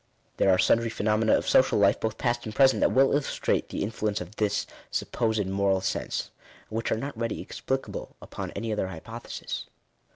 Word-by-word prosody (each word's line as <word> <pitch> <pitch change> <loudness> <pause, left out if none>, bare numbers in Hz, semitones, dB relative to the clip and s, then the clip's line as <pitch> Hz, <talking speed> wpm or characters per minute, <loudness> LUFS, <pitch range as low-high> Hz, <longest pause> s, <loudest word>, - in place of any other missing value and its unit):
There - - +3
are 95 - +5
sundry 115 +4 +3
phenomena 110 0 +2
of - - -4
social 130 - +4
life, 100 -1 +4
both 110 0 -2
past 120 -1 0
and 110 - -6
present, 135 -1 +5
that - - +3
well 135 +1 +4
illustrate 145 -1 0
the - - -2
in 105 - -2
fluence 105 -2 -1
of 105 - -9
this 105 -1 +1 0.2
supposed 110 -3 0
moral 95 0 +1
sense, 95 - -2 0.4
and 110 - -1
whioh - - -3
are - - -1
not 140 +4 -4
readily 115 0 -2
explicable 135 0 -4
upon - - -6
any 115 -1 -2
other 105 -3 -1
hypothesis. 110 +7 -6
110 Hz, 190 wpm, -27 LUFS, 100-120 Hz, 0.4 s, are